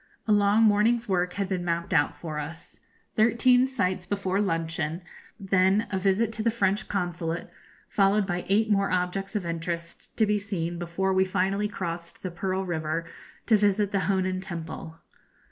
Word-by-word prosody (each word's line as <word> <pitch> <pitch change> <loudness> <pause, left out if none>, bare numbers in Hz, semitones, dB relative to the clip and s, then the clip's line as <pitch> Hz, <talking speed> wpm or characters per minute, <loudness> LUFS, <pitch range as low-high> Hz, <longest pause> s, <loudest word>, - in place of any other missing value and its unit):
A - - +2
long 205 +1 +4
morning's 225 +3 +3
work 180 -2 0
had 200 -1 -2
been 185 -2 -2
mapped 170 -1 -2
out 145 -2 +2
for 155 -3 -5
us 160 +3 -8 0.4
thirteen 245 +3 +4
sights 190 -9 -1
before 200 -1 0
luncheon, 165 -2 -2 0.4
then 195 +1 +3
a 190 - 0
visit 200 +4 +1
to 225 - -3
the 230 - +2
French 205 -3 0
Consulate, 175 -3 -3 0.4
followed 200 +1 +3
by 175 -2 -2
eight 215 +2 +3
more 200 -1 +3
objects 185 +2 -1
of 200 -4 -1
interest 170 0 -5
to 220 - +4
be 210 0 +1
seen 175 -4 -3
before 175 +3 -1
we 190 0 +4
finally 195 +2 0
crossed 170 -4 -6
the 185 - -3
Pearl 190 +2 -2
River 165 -1 -2 0.4
to 225 - +5
visit 205 -1 +2
the 195 - +1
Honan 185 -1 0
Temple. 165 -2 -7
190 Hz, 165 wpm, -27 LUFS, 170-205 Hz, 0.4 s, to